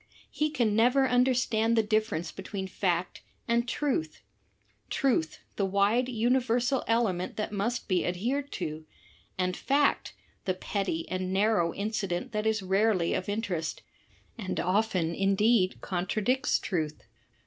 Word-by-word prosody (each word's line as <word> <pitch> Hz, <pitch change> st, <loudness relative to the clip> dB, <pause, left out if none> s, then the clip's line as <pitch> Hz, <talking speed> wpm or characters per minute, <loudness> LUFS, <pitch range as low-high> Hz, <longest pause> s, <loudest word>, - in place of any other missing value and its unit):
He 305 Hz, 0 st, 0 dB
can 235 Hz, -8 st, +1 dB
never 250 Hz, +4 st, +4 dB
understand 245 Hz, -3 st, +2 dB
the 225 Hz, -, +4 dB
difference 215 Hz, -6 st, 0 dB
between 195 Hz, -2 st, -5 dB
fact 180 Hz, -2 st, -1 dB, 0.3 s
and 235 Hz, +1 st, +1 dB
truth 240 Hz, -, -2 dB, 0.3 s
— -, -, -44 dB, 0.3 s
truth, 235 Hz, -, +1 dB, 0.2 s
the 200 Hz, -, +1 dB
wide 205 Hz, +6 st, +2 dB
universal 245 Hz, +2 st, +1 dB
element 215 Hz, -6 st, 0 dB
that 210 Hz, -, -2 dB
must 230 Hz, +4 st, -2 dB
be 185 Hz, -3 st, +1 dB
adhered 250 Hz, +11 st, -2 dB
to; 155 Hz, -2 st, -5 dB, 0.5 s
and 185 Hz, 0 st, 0 dB
fact, 280 Hz, +1 st, +1 dB, 0.3 s
the 185 Hz, -, 0 dB
petty 185 Hz, -3 st, -2 dB
and 185 Hz, 0 st, -3 dB
narrow 195 Hz, -3 st, +2 dB
incident 200 Hz, +1 st, -3 dB
that 210 Hz, 0 st, -1 dB
is 220 Hz, -2 st, +1 dB
rarely 190 Hz, -2 st, +2 dB
of 185 Hz, -, -2 dB
interest, 195 Hz, -7 st, -3 dB, 0.6 s
and 190 Hz, -4 st, -3 dB
often 185 Hz, -3 st, +1 dB
indeed 195 Hz, +1 st, +2 dB
contra 190 Hz, +3 st, -2 dB
dicts 260 Hz, +6 st, +2 dB
truth. 155 Hz, -5 st, -3 dB
210 Hz, 135 wpm, -29 LUFS, 185-235 Hz, 0.6 s, never